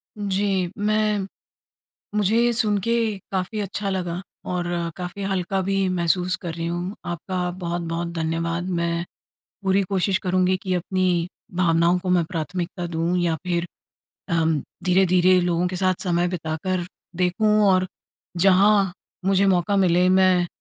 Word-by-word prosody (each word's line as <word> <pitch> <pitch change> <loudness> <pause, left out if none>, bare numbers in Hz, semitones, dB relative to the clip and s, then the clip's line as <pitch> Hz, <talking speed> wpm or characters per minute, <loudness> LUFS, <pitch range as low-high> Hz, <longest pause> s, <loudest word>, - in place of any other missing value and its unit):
जी, 195 -3 0
मैं 210 -1 +1 0.9
मुझे 210 +1 +2
ये 240 - +3
सुन 215 -3 +2
के 230 +4 0 0.4
काफ़ी 190 +3 -2
अच्छा 200 0 -3
लगा 180 -2 -2 0.3
और 180 -1 -1 0.3
काफ़ी 180 +2 -5
हल्का 190 0 -1
भी 195 0 0
महसूस 180 +1 +1
कर 170 -3 -4
रही 165 0 -4
हूँ, 175 +4 -3
आपका 180 +1 -3
बहुत-बहुत 170 -1 -3
धन्यवाद। 165 +2 -2
मैं 170 -1 -1 0.6
पूरी 195 0 +2
कोशिश 195 0 +1
करुँगी 185 -2 +1
कि 185 -1 -1
अपनी 180 -1 0 0.3
भावनाओं 170 0 +3
को 185 +1 -6
मैं 180 -2 +3
प्राथमिकता 175 +2 -4
दूँ 170 +1 -1
या 170 -2 +1
फिर 175 -1 0 0.6
अम, 160 -2 +1 0.2
धीरे-धीरे 185 0 +4
लोगों 175 0 +1
के 185 - -4
साथ 185 0 +2
समय 175 -1 +1
बिताकर 175 +1 -2 0.3
देखूँ 180 +4 +1 0.2
और 185 -1 +3 0.5
जहाँ 195 +1 +5 0.3
मुझे 195 0 +3
मौका 190 +1 +2
मिले, 180 -1 +4
मैं 185 -1 +4
180 Hz, 135 wpm, -23 LUFS, 175-195 Hz, 0.9 s, जहाँ